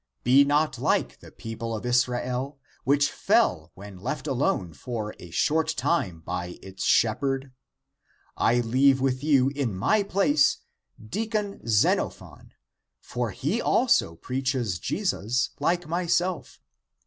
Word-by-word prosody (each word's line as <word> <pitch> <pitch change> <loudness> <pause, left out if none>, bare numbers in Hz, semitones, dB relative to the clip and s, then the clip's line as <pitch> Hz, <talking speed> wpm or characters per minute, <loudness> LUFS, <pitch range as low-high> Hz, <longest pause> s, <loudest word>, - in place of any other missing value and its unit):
Be 130 +3 +6
not 145 -2 +1
like - - 0
the - - -14
people 115 0 -6
of 110 - -6
Israel, 125 +2 0 0.3
which 145 +1 +3
fell - - +1
when 100 -1 -11
left - - -4
alone 85 -3 -1
for 110 +1 -5
a 90 - -11
short 160 - +1
time 130 - 0
by 90 +1 -5
its 95 0 -7
shep 110 -2 +3
herd.^ 135 -1 -2 0.8
I 120 +1 +2
leave 130 +3 +3
with 130 0 -1
you 135 -4 +4
in 140 -7 -3
my 205 - +2
place 175 -7 +2 0.4
deacon 210 - -3
Xeno 105 -2 +3
phon, - - -15 0.5
for 120 -2 -3
he 150 - -2
also 235 - +2
preaches 125 - -2
Jesus 125 - -1
like 170 +4 0
myself. 175 +1 -1
130 Hz, 130 wpm, -26 LUFS, 115-150 Hz, 0.8 s, Be